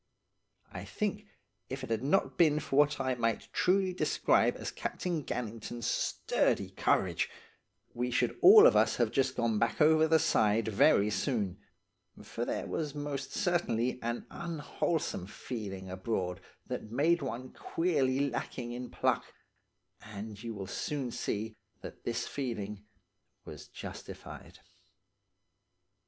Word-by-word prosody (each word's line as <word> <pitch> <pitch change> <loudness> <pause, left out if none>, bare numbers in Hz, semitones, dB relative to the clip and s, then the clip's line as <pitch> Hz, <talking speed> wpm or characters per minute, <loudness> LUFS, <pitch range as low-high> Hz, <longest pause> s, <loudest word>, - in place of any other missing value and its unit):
I - - -6
think, 210 0 -3 0.4
if 130 0 -5
it 125 - -5
had 110 - 0
not 150 +8 +2
been 155 -3 +4
for 135 - -4
what 145 -1 +4
I 130 -1 0
might 115 -2 -2
truly 190 0 +2
describe 180 - +2
as - - -5
Captain 170 -4 -3
Gannington's 115 -1 -5
sturdy - - 0
courage, - - +1 0.6
we 125 +1 -1
should 120 0 +1
all 420 +3 +10
of - - +7
us - - +4
have - - +1
just 135 -2 +1
gone 115 -2 +1
back 115 - 0
over 155 +1 +5
the 160 0 +5
side 115 -8 +2
very 105 0 +4
soon, 105 -6 -1 0.6
for - - -4
there - - -2
was 150 -3 -3
most 145 -2 -4
certainly 145 - 0
an 120 +1 -3
unwholesome 160 - -2
feeling 100 -4 -6
abroad 95 -1 -3 0.2
that 110 - -5
made 160 +7 +2
one 130 -1 -5
feel - - -20
queerly 140 -5 +1
lacking 120 -3 -4
in 125 +1 -6
pluck; - - 0 0.7
and 105 0 -8
you 115 -1 -5
will 100 -1 -5
soon 130 +5 -3
see 110 0 -3 0.3
that - - -10
this 120 +1 -1
feeling 105 -6 -4 0.6
was - - -10
justified. 90 +2 -9
125 Hz, 135 wpm, -31 LUFS, 110-150 Hz, 0.7 s, all